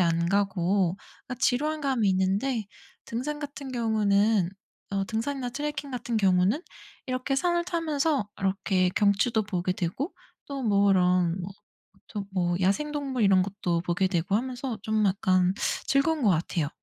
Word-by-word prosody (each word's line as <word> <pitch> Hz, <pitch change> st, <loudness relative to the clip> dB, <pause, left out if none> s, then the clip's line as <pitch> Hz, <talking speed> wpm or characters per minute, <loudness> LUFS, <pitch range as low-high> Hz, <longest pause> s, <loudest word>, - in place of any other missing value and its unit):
안 170 Hz, -1 st, +2 dB
가고 190 Hz, -1 st, +1 dB, 0.3 s
아 255 Hz, -, -3 dB
지루한 300 Hz, +5 st, +1 dB
감이 255 Hz, -7 st, +1 dB
있는데 200 Hz, +6 st, 0 dB, 0.4 s
등산 270 Hz, +6 st, -3 dB
같은 285 Hz, -2 st, -7 dB
경우는 215 Hz, -4 st, +2 dB, 0.4 s
어 195 Hz, 0 st, 0 dB
등산이나 245 Hz, +5 st, -3 dB
트래킹 290 Hz, +1 st, -4 dB
같은 240 Hz, -1 st, -2 dB
경우는 195 Hz, -, +3 dB, 0.5 s
이렇게 255 Hz, +1 st, -1 dB
산을 345 Hz, +2 st, +1 dB
타면서 310 Hz, -, 0 dB
이렇게 190 Hz, -1 st, +1 dB
경치도 210 Hz, +2 st, +3 dB
보게 185 Hz, -3 st, -2 dB
되고 190 Hz, -, -3 dB, 0.3 s
또 280 Hz, -1 st, -5 dB
뭐 200 Hz, -2 st, +4 dB
이런 180 Hz, -1 st, +3 dB
뭐 180 Hz, +2 st, -5 dB, 0.6 s
근처 205 Hz, -2 st, -5 dB, 0.3 s
야생동물 275 Hz, +5 st, 0 dB
이런 195 Hz, -2 st, +5 dB
것도 185 Hz, -3 st, -2 dB
보게 180 Hz, +2 st, +1 dB
되고 180 Hz, +1 st, 0 dB
하면서 250 Hz, +1 st, -2 dB
좀 215 Hz, -1 st, +1 dB
약간 185 Hz, -1 st, +2 dB, 0.3 s
즐거운 295 Hz, +2 st, +2 dB
것 210 Hz, -, +5 dB
같아요. 165 Hz, -2 st, 0 dB
210 Hz, 290 characters per minute, -27 LUFS, 185-270 Hz, 0.6 s, 이런